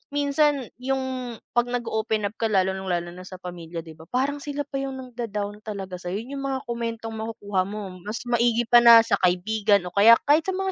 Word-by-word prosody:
minsan 285 -2 +1
yung 260 -2 -3 0.2
'pag 240 0 +2
nag-o-open 220 -3 -1
up 220 - -21
ka 225 - +1
lalo 190 -3 +2
ng 190 0 -6
lalo 175 -1 -1
na 180 +1 -11
sa 185 - -9
pamilya 170 -2 -7
di 160 - -11
ba, 160 - -13
parang 275 +3 0
sila 290 0 -4
pa 275 - -6
yung 270 0 -3
nang-da-down 225 -5 -5
talaga 195 -3 -5
sa'yo 185 +4 -4
yung 275 +2 -6
mga 265 -1 -2
komentong 230 -1 -4
makukuha 205 -3 -2
mo 200 -3 -6
mas 215 +2 -4
maigi 240 0 +2
pa 240 - +8
na 230 -1 +10
sa 200 -3 +1
kaibigan 200 +3 +2
o - - -25
kaya 210 +5 +7 0.2
kahit 310 +2 +5
sa 380 - 0
mga 385 0 -1
225 Hz, 205 wpm, -25 LUFS, 195-255 Hz, 0.2 s, na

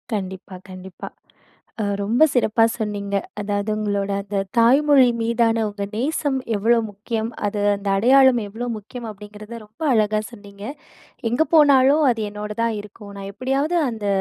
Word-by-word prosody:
கண்டிப்பா, 190 -1 -6
கண்டிப்பா. 185 -1 -9 0.8
அ - - 0 0.2
ரொம்ப 225 +7 +1
சிறப்பா 225 -2 +3
சொன்னீங்க. 205 -2 -3 0.2
அதாவது 205 +1 -2
உங்களோட 205 -2 -2
அந்த 200 0 -4 0.2
தாய்மொழி 270 +3 +5
மீதான 230 0 +1
உங்க 205 -1 -5
நேசம் 280 +3 -1 0.2
எவ்ளோ 230 +4 +3
முக்கியம். 220 +2 -4 0.2
அது 205 0 -2 0.2
அந்த 200 0 -6
அடையாளம் 260 +3 +5
எவ்ளோ 225 +4 -6
முக்கியம் 230 +3 -9
அப்டிங்கிறத 210 +2 -10
ரொம்ப 215 +7 -15
அழகா 215 -2 +2
சொன்னீங்க. 200 -2 -13 0.7
எங்க 245 +7 +2
போனாலும் 285 -1 +5
அது 230 -2 0
என்னோட 210 +1 -6
தான் 230 -1 +1
இருக்கும். 205 0 -11
நான் 195 0 -7
எப்டியாவது 270 - -1
அந்த 220 -3 -5
215 Hz, 140 wpm, -21 LUFS, 205-245 Hz, 0.8 s, தாய்மொழி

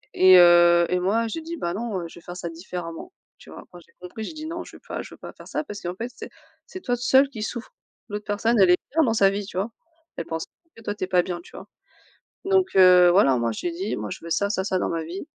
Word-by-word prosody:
Et 185 0 +7
heu, 175 -1 +6
et 180 0 +1
moi 220 +5 0
j'ai 325 +9 -5
dit: 335 +1 -7
«Bah 170 - -3
non, 200 -5 -4
je 170 - -13
vais - - -21
faire 175 0 -8
ça 175 - -5
différemment», 170 - -8 0.3
tu - - -16
vois? - - -11
Quand 175 - -12
j'ai 170 - -23
compris, 180 +5 -8
j'ai 315 - -6
dit: 310 0 -8
«Non 335 +1 -5
je - - -14
veux - - -15
pas - - -4
je - - -11
veux - - -23
pas - - -10
faire - - -14
ça, - - -3
parce 210 -8 -9
qu'en 175 +1 -5
fait, 235 +5 -5
c'est - - -9 0.4
c'est 370 - -9
toi 245 -1 -1
seule 265 +3 +3
qui 225 -6 -8
souffre». 240 - -6 0.4
L'autre 210 0 -5
personne, 210 +2 0
elle 190 -2 +6
est 180 - +6
bien 320 +1 +3
dans 225 -4 +1
sa 195 -2 +5
vie, 200 0 -4
tu 185 - -9
vois? 205 +5 -2 0.5
Elle 165 - -4
pense 165 0 -4
pas - - -56 0.3
que 230 - -14
toi 205 - -3
tu 200 - -4
es - - -15
pas 180 -2 +3
bien, 175 -2 -5
tu - - -17
vois? - - -11 0.8
Donc, 380 -1 +1
heu, 180 -2 +7
voilà 140 -8 +4
moi 115 -1 -1
j'ai 175 +10 -4
dit: 185 +5 -4
«Moi 105 -1 -5
je - - -8
veux 170 - -8
ça, 200 +5 0
ça, 190 -2 -1
ça 190 -2 0
dans - - -1
ma 165 -1 -3
vie. 175 +4 -7
190 Hz, 290 wpm, -24 LUFS, 175-230 Hz, 0.8 s, Et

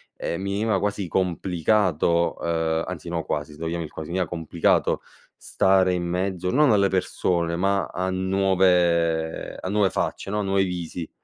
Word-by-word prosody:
ehm, 85 - -3
mi 100 +1 -3
veniva 110 0 +1
quasi 100 -2 -2
complicato 90 -1 +1
uhm, 80 -1 0
anzi 85 -2 -6
no 85 -2 -2
quasi 75 0 -3
se - - -14
vogliamo 85 +1 -3
il 75 - -9
quasi, 80 +1 -7
mi 90 - -1
era 90 - 0
complicato 80 0 0 0.3
stare 95 -1 +2
in 90 -1 -1
mezzo, 90 0 -2
non 145 -1 +4
alle 100 -2 +4
persone, 85 -2 0
ma 95 +2 +1
a 95 +1 -3
nuove 90 -4 +1
a 95 - -5
nuove 100 -1 +2
facce, 100 - -3
no, 105 0 -1
nuovi 95 0 +2
visi, 85 -2 -5
90 Hz, 165 wpm, -24 LUFS, 85-95 Hz, 0.3 s, non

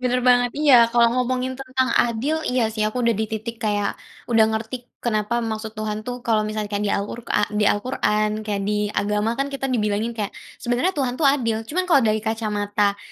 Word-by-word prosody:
benar 250 0 +1
banget 245 0 +4
iya, 295 -3 +5
kalau 235 0 +4
ngomongin 255 +1 -1
tentang 260 0 0
adil, 255 +7 0
iya 250 -1 +1
sih, 215 - -5
aku 245 +2 -2
udah 230 - +4
di - - +1
titik 230 +2 -5
kayak 205 -2 0 0.4
udah 225 -1 +6
ngerti 240 +2 -6
kenapa 215 0 0
maksud 220 -1 -4
Tuhan 215 0 -3
tuh, 245 +1 -6
kalau 220 -2 +3
misalnya 215 -1 -3
kayak 205 +1 -1
di - - 0
Alqurkan 210 +1 -1
di 210 0 +2
Al 205 - +1
Qur'an, 215 -4 0
kayak 205 -2 -2
di 210 0 0
agama 210 +2 0
kan 275 - +1
kita 270 -1 -4
dibilangin 215 -1 0
kayak 205 -2 -3 0.3
sebenernya 245 +8 0
Tuhan 255 -3 0
tuh 310 - -5
adil, 230 -5 +1
cuman 365 +4 0
kalau 280 -7 +5
dari 215 -1 +2
kacamata 205 -2 0
225 Hz, 195 wpm, -22 LUFS, 210-250 Hz, 0.4 s, udah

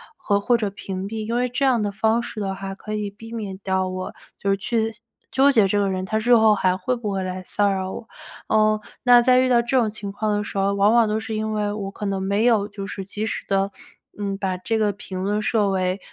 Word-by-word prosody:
和 200 -8 0
或 240 +3 +3
者 215 -3 -1
屏 195 -1 -5
蔽， 215 0 -5
因 230 - -1
为 250 +1 +1
这 250 +3 -2
样 250 -4 +3
的 205 - -1
方 220 +4 +1
式 225 - -6
的 195 -2 -2
话 195 0 -6
可 215 +2 -7
以 210 -1 -2
避 225 +3 -12
免 210 -5 -5
掉 190 -1 0
我 185 0 -5 0.2
就 200 - -1
是 195 - +2
去 225 +2 -1 0.4
纠 275 +2 +5
结 220 -7 +4
这 205 +2 +1
个 200 -1 +1
人 185 0 -2
他 215 +3 -1
日 240 +3 +3
后 220 -2 +5
还 185 -2 +2
会 200 +7 -1
不 225 -4 -4
会 195 -1 -1
来 185 0 -4
骚 205 +2 +1
扰 190 -1 -2
我。 225 - -8 0.4
呃， 215 0 +3 0.2
那 245 -1 +7
在 250 +1 +4
遇 255 - +3
到 240 -1 +5
这 245 +3 0
种 230 -4 +3
情 205 -2 -6
况 210 +1 -1
的 205 - -1
时 200 - -6
候， 195 +1 +2
往 200 +1 +4
往 235 -2 +5
都 215 +1 0
是 220 0 -5
因 215 0 -2
为 210 -1 -1
我 200 -2 -4
可 210 - -6
能 195 -1 -1
没 200 +3 +1
有 220 -4 +3
就 200 -1 -7
是 195 -1 -6
及 205 +2 -3
时 - - -4
地， 195 0 +1 0.5
嗯， 200 -1 -2
把 190 -2 -1
这 220 +5 -1
个 210 -1 +2
评 190 -2 -7
论 205 +2 0
设 215 -2 +1
为 185 0 0
205 Hz, 280 characters per minute, -23 LUFS, 195-220 Hz, 0.5 s, 那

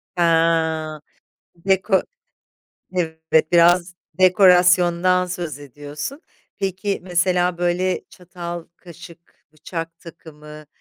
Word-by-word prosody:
He 175 - -1 1.5
deko 190 0 +2 0.9
evet, 160 -2 0
biraz 175 +1 +4 0.2
dekorasyondan 180 -1 +4
söz 175 -5 -5
ediyorsun, 145 - -8 0.4
peki, 195 +1 -2
mesela, 180 0 0
böyle, 175 +1 0
çatal, 175 -1 -8
kaşık, 170 -1 -15
bıçak 165 +1 -7
takımı, 155 -2 -13
175 Hz, 80 wpm, -21 LUFS, 165-180 Hz, 1.5 s, biraz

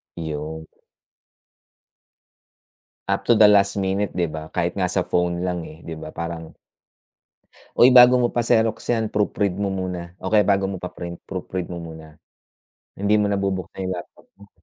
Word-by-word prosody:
Yun. 80 -1 -5 2.4
Up - - 0
to - - +6
the 105 0 +7
last 100 -1 +4
minute, 95 +1 -1
di 90 -2 -1
ba? 80 0 -8
Kahit 90 0 -1
nga 90 -2 0
sa 90 -1 0
phone 90 0 0
lang 90 -2 -2
eh, 80 - -11
di 80 - -5
ba, 80 - -8
parang 85 -1 -6 1.3
"Uy, 125 +1 +7
bago 125 0 +8
mo 120 -1 +2
pa-xerox 115 -2 +2
yan, 115 -3 0
proofread 100 -2 0
mo 100 -1 0
muna, 90 -2 -5
o 95 - -3
kaya 105 -2 +4
bago 100 -1 +2
mo 95 - -4
pa-print, 85 -1 -7
proofread 95 -1 -4
mo 85 - -5
muna." 80 -2 -10 0.8
Hindi 100 +1 +2
mo 105 -1 +2
na 100 - 0
bubuksan 95 -1 -3
yung 95 - -2
laptop 85 - -11
mo? 100 0 -18
95 Hz, 165 wpm, -22 LUFS, 85-100 Hz, 2.4 s, bago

